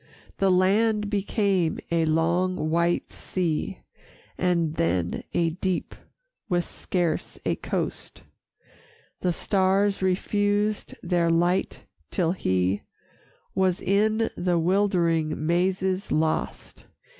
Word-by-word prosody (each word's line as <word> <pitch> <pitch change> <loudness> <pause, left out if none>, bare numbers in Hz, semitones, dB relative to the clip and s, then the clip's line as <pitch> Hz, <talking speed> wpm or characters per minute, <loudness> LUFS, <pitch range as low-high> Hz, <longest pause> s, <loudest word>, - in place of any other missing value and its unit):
The 195 - +3
land 210 +3 +2
became 200 -4 +1
a 165 -1 +2
long 165 +1 +1
white 170 +1 +1
sea, 170 -5 -2 0.5
And 170 -3 +1
then 85 - -1
a 165 -1 +2
deep 185 +1 -2 0.6
with 175 -2 +1
scarce 175 -3 -2
a - - +1
coast, - - -4 1.0
The 180 - +1
stars 195 +2 +1
refused 205 +3 0
their 170 -1 +1
light, 175 +3 +1 0.3
till 170 -5 +1
he 95 - 0 0.7
Was 185 -2 +1
in 215 +3 +1
the 175 -1 +1
wildering 170 -4 +1
mazes 185 +3 0
lost. 155 0 -2
180 Hz, 100 wpm, -25 LUFS, 165-195 Hz, 1.0 s, The